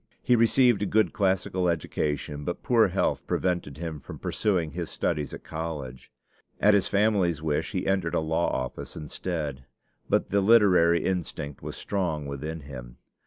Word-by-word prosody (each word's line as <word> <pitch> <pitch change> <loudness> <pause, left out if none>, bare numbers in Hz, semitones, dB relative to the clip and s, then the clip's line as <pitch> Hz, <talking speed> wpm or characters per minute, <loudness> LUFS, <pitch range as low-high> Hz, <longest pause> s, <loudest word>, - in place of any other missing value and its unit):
He 125 - +4
received 120 0 +4
a 105 - 0
good 110 -5 +2
classical 95 -2 +1
education; 75 -2 -2
but 85 - -4
poor 115 -3 +4
health 95 +1 -1
prevented 90 -7 -1
him 80 -2 -5
from - - -9
pursuing 90 -7 0
his - - -4
studies 75 -1 -2
at - - -9
college. 75 -6 -6 0.5
At 105 +1 +5
his 100 -2 +3
family's 100 -6 +2
wish 75 -2 -1
he - - -1
entered 95 -4 0
a - - +3
law 80 +2 0
office 65 -1 -4
instead; 75 -3 -4 0.4
but - - +1
the 100 +1 +2
literary 95 -6 +5
instinct 80 -6 -3
was - - -6
strong 85 -7 -2
within 75 +3 -5
him. 65 -4 -10
85 Hz, 160 wpm, -27 LUFS, 75-100 Hz, 0.5 s, At